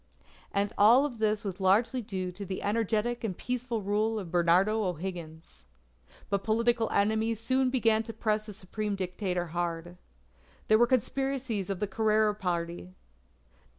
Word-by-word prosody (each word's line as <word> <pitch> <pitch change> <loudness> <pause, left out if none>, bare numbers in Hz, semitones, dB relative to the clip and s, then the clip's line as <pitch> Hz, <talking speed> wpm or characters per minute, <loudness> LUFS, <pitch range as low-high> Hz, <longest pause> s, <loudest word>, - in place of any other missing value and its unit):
And 200 0 0
all 240 +8 +6
this 215 -3 -1
was 195 -2 -5
largely 225 +7 +3
due 185 -4 -4
to 200 +3 -8
the 190 -1 -5
energetic 225 +3 0
and 195 -6 -3
peaceful 245 -3 -3
rule 215 +3 0
of 185 -6 -6
Bernardo 180 +5 +3
O'Higgins. 170 - -6 0.6
But 200 -1 -1
political 230 +1 +1
enemies 220 +2 +1
soon 260 +3 +2
began 225 -4 +2
to - - -4
press 215 -1 -1
the 210 - -6
Supreme 205 +2 -3
Dictator 180 -1 -2
hard. 175 0 -3 0.7
There 215 0 +6
were 240 - +5
conspiracies 255 -4 -1
of 195 -2 -2
the 210 - 0
Carrera 215 +1 +2
party. 175 -2 -4
210 Hz, 145 wpm, -29 LUFS, 185-225 Hz, 0.7 s, all